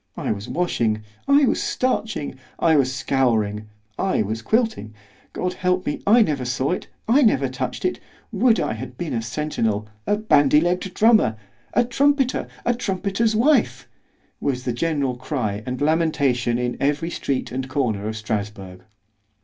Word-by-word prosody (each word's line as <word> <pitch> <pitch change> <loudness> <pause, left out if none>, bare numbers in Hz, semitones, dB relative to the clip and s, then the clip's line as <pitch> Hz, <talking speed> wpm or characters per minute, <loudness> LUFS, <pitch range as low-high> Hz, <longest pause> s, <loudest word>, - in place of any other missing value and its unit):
—I - - -2
was 105 -1 -5
washing, 115 -11 0 0.2
I 280 +1 +5
was - - +1
starching, 215 - -1 0.2
I 160 -1 +3
was 135 -3 +3
scouring, 115 -6 0 0.3
I 190 - +1
was 110 +2 -4
quilting——God 180 - -3
help 180 0 0
me! 145 - -3
I 225 +3 +7
never 145 -9 -1
saw 125 +3 -1
it——I 230 +8 0
never 140 - +3
touch'd 130 - -4
it!——would 235 - 0
I - - -1
had 125 -1 -8
been 165 -6 -4
a 115 - -1
centinel, 115 -4 -2 0.2
a 205 - +2
bandy 150 -9 +4
legg'd 180 +3 -1
drummer, 215 - +4 0.4
a 240 - +4
trumpeter, 270 +1 +1 0.2
a 240 - +3
trumpeter's 210 0 -1
wife, 280 +7 +2 0.5
was 130 -3 -2
the 125 - -1
general 140 -2 -1
cry 110 -7 -3
and 125 0 -3
lamentation 145 -6 +1
in 125 0 -2
every 150 +4 0
street 135 -5 -2
and 130 +1 -4
corner 115 -7 -1
of 110 - -3
_Strasburg. 105 -4 -4
145 Hz, 150 wpm, -22 LUFS, 120-200 Hz, 0.5 s, I